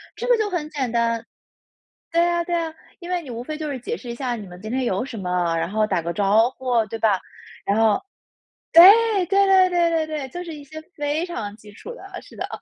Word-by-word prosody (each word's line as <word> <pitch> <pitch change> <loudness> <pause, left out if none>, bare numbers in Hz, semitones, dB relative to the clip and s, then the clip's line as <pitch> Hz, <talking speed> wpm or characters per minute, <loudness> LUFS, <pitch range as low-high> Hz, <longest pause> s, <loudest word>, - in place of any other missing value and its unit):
这 485 - -5
个 485 -2 +4
就 430 -2 0
很 320 -5 -3
简 275 -5 -2
单。 230 0 0 0.9
对 335 +1 +3
啊 345 0 +1
对 345 0 -2
啊， 330 -2 -2 0.3
因 350 0 -9
为 360 -1 -1
你 285 - -11
无 235 0 -5
非 310 +4 -5
就 310 -1 -4
是 270 - -4
解 440 - -4
释 245 - -10
一 235 - -4
下 245 -1 -2
你 205 -4 -8
们 180 0 -12
今 215 +1 -6
天 260 0 0
有 200 0 -1
什 265 - -8
么， 180 -3 -1
然 165 +2 -1
后 215 +1 +1
打 180 - -1
个 170 +1 -3
招 210 +5 +3
呼， 250 -3 +1
对 225 - -5
吧？ 210 -4 +2 0.5
然 200 - +1
后 220 -2 +3 0.7
对， 335 +2 +10 0.4
对 395 +2 +3
对 380 -1 +5
对 345 -1 +2
对 320 -1 0
对， 300 -4 -4
就 350 +7 -6
是 330 - -7
一 295 - -10
些 315 +3 -9 0.2
非 295 +3 -1
常 215 - -5
基 210 -1 -15
础 475 - -10
的， 385 -4 -10
是 - - -16
的。 - - -4
265 Hz, 260 characters per minute, -22 LUFS, 220-340 Hz, 0.9 s, 对